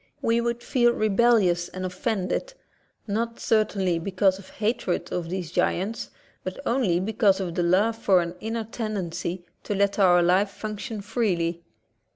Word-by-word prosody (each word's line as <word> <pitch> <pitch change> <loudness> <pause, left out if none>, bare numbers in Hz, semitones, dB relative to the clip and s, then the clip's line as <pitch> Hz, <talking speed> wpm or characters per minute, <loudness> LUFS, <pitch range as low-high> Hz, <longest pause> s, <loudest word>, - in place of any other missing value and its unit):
We 230 +1 +2
would 235 0 -2
feel, 240 -2 +3
rebellious 210 -5 +3
and 185 0 -5
offended, 195 - -2 0.5
not 230 +2 -2
certainly 195 -5 +1
because 190 +1 +1
of 195 - -13
hatred 215 -4 -2
of 170 -2 -3
these 180 -3 -4
giants, 195 +5 -1 0.3
but 185 - -5
only 230 -9 +2
because 200 0 +2
of 180 -3 -3
the 175 - 0
love 195 +6 +2
for 195 -5 +4
an 170 0 -2
inner 225 +1 -3
tendency 185 -6 -4 0.2
to 205 - -3
let 200 +1 +1
our 175 -2 +5
life 185 +4 +3
function 215 +2 -6
freely. 185 -7 -1
200 Hz, 150 wpm, -25 LUFS, 180-225 Hz, 0.5 s, our